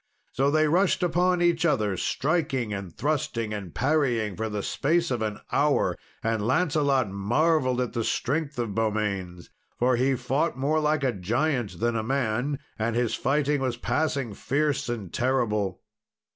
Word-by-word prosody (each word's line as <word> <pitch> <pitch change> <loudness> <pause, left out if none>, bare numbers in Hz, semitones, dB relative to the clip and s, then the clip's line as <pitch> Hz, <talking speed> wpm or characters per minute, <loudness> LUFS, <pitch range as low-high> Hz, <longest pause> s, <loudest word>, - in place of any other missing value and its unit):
So 135 +2 +1
they 155 +1 +3
rushed 180 +3 +2
upon 180 +1 +2
each 170 -1 +2
other, 110 - +2
striking, 135 - 0
and 100 -3 -5
thrusting, 115 - -2
and 100 -5 -5
parrying, 125 - +1
for 110 0 -3
the 105 -1 -3
space 165 +2 +1
of 120 -2 -1
an 105 -1 -2
hour. - - +2 0.3
And 115 -2 0
Lancelot 140 - +2
marvelled 130 +6 +1
at 125 -2 -1
the 115 -2 -1
strength 145 +5 -1
of 115 -4 -2
Beaumains, 100 -5 -2 0.3
for 125 0 +2
he 130 +2 +2
fought 140 +5 -1
more 145 +4 +1
like 150 -1 +1
a 130 -2 +2
giant 120 - -1
than 120 +1 +1
a 110 - 0
man, 130 +2 -1 0.2
and 110 +1 0
his 120 -2 +1
fighting 145 0 +1
was 125 -3 -1
passing 140 -4 -1
fierce 145 +2 -1
and 110 -7 -4
terrible. 110 -7 0
130 Hz, 160 wpm, -26 LUFS, 110-150 Hz, 0.3 s, they